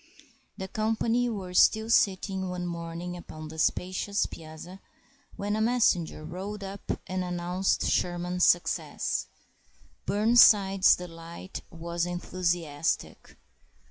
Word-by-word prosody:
The 190 - -5
company 225 +4 0
were 195 -5 -5
all 220 +4 +4
sitting 190 -3 +2
one 180 0 -4
morning 170 +1 -5
upon 155 -3 -9
the 160 0 -9
spacious 185 +5 0
piazza, 160 +4 -10 0.6
when 205 +1 -2
a 215 - -1
messenger 220 -10 +1
rode 195 +5 -6
up 195 +1 -5
and 185 0 -2
announced 180 +1 -1
Sherman's 180 0 0
success. 175 - +1 0.8
Burnside's 205 -3 +6
delight 170 +1 -9
was 170 0 -3
enthusiastic. 175 -4 -2
180 Hz, 105 wpm, -28 LUFS, 170-200 Hz, 0.8 s, Burnside's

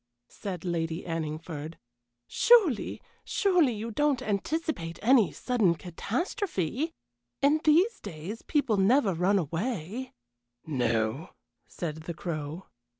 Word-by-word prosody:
said 185 -4 -6
Lady 165 -1 -2
Anningford. 160 -1 -4 0.5
"Surely, 395 - +4 0.2
surely 360 - +3
you 225 +2 -5
don't 290 +2 +1
anticipate 205 - -2
any 235 -3 +5
sudden 220 -9 +1
catastrophe? 250 - -2 0.5
In 295 +2 +4
these 350 +9 +4
days 190 +3 -7
people 275 -8 +1
never 200 +1 +4
run 180 +4 +2
away 195 - -3 0.2
" 120 - -56 0.2
"No," 120 +1 -1 0.3
said 155 -3 -5
the 160 +1 -6
Crow. 160 0 -5
195 Hz, 105 wpm, -28 LUFS, 165-265 Hz, 0.5 s, any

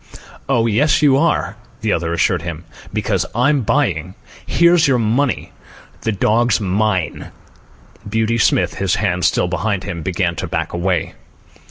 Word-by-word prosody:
"Oh, 120 -4 +2
yes 145 +7 +2
you 140 -3 +5
are," 140 -9 0 0.2
the 110 -2 +1
other 85 0 -1
assured 90 0 +1
him. 85 -1 -6 0.3
"Because - - 0
I'm 135 +4 +2
buying. 110 - 0 0.3
Here's 170 -1 +4
your 130 -2 +3
money. 120 +4 0 0.5
The 110 - -1
dog's 110 +4 +2
mine." 95 -3 -1 0.8
Beauty 110 +2 0
Smith, - - +2
his 95 -1 +1
hands 90 -4 +1
still - - +1
behind 95 +2 -2
him, 85 -1 -5
began 85 0 -1
to - - -3
back - - -3
away. 85 -1 -1
105 Hz, 145 wpm, -18 LUFS, 90-120 Hz, 0.8 s, you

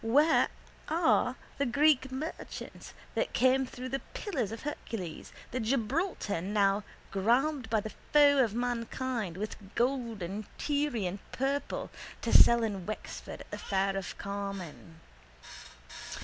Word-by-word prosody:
Where 290 +8 +5 0.4
are 325 +1 +3 0.2
the 280 - +3
Greek 280 0 +4
merchants 300 +5 -6 0.2
that - - -1
came 260 +1 +4
through 255 +1 -6
the 270 +1 -2
pillars 270 - -2
of 225 - -6
Hercules, 220 - -5 0.2
the 255 - -1
Gibraltar 240 - 0
now 200 +1 +2 0.3
grabbed 245 +6 +2
by 220 -1 +2
the 220 - -6 0.2
foe 290 -1 +7
of 220 -3 -1
mankind, 240 -4 -2
with 205 -1 -6
gold 235 -5 0
and 200 +5 -4
Tyrian 245 - 0
purple 275 +2 -1 0.3
to - - 0
sell 235 -1 +8
in 200 -4 -2
Wexford 215 - -6
at - - -13
the - - -4
fair 195 0 0
of 195 -1 -4
Carmen? 195 -5 -6
235 Hz, 130 wpm, -31 LUFS, 200-270 Hz, 0.4 s, sell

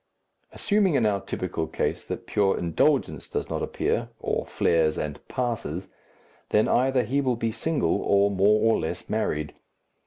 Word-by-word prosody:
Assuming 200 -5 +1
in 120 - +3
our 100 -2 +1
typical 90 -4 -3
case - - -2
that - - -5
pure 100 -2 +1
indulgence 85 -2 +1
does - - -3
not - - -2
appear 115 +1 -1
or - - -2
flares 80 -2 +2
and 75 -1 -4
passes, 115 - -3 0.6
then 105 - +3
either 130 0 +2
he 135 +6 0
will 130 -3 +1
be 115 -1 -1
single 115 - 0
or 100 0 +3
more 100 +2 +3
or - - +1
less 80 - -4
married. 75 0 -1
105 Hz, 155 wpm, -26 LUFS, 85-125 Hz, 0.6 s, in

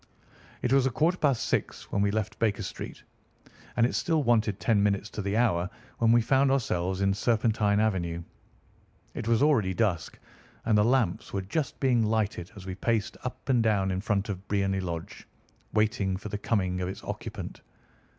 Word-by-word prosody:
It 125 - +2
was 135 -1 +4
a - - +2
quarter 160 +8 +1
past 140 -5 +2
six - - -2
when 100 - +1
we 100 - +3
left 105 0 -2
Baker 105 -2 +1
Street, - - -7 0.7
and 115 - +5
it 125 - 0
still 160 -3 +1
wanted 110 -5 +2
ten 110 -4 +2
minutes 100 0 0
to - - -4
the 100 +2 -1
hour 90 -7 +2 0.3
when 115 -1 +4
we 120 0 +5
found 135 +3 +3
ourselves 95 -8 0
in 100 0 +3
Serpentine 105 -1 +2
Avenue. 85 -6 0 0.9
It - - -5
was 115 +2 +3
already 110 -12 +3
dusk, 95 -9 0 0.5
and 110 -2 +3
the 105 - +5
lamps 115 -4 +1
were 100 -1 -1
just 135 - -2
being 125 -4 +3
lighted 105 -5 -1
as 95 -2 -10
we 95 - -4
paced 105 +2 -1
up 130 +1 -6
and 125 -3 +3
down 100 -4 +2
in 95 0 -1
front 105 0 0
of 100 0 -5
Briony 100 -1 +1
Lodge, 85 -3 -6 0.4
waiting 105 -3 +1
for 105 +2 -7
the 105 - -4
coming 95 -4 0
of 90 - -2
its 95 - -7
occupant. - - -6
105 Hz, 185 wpm, -28 LUFS, 95-120 Hz, 0.9 s, and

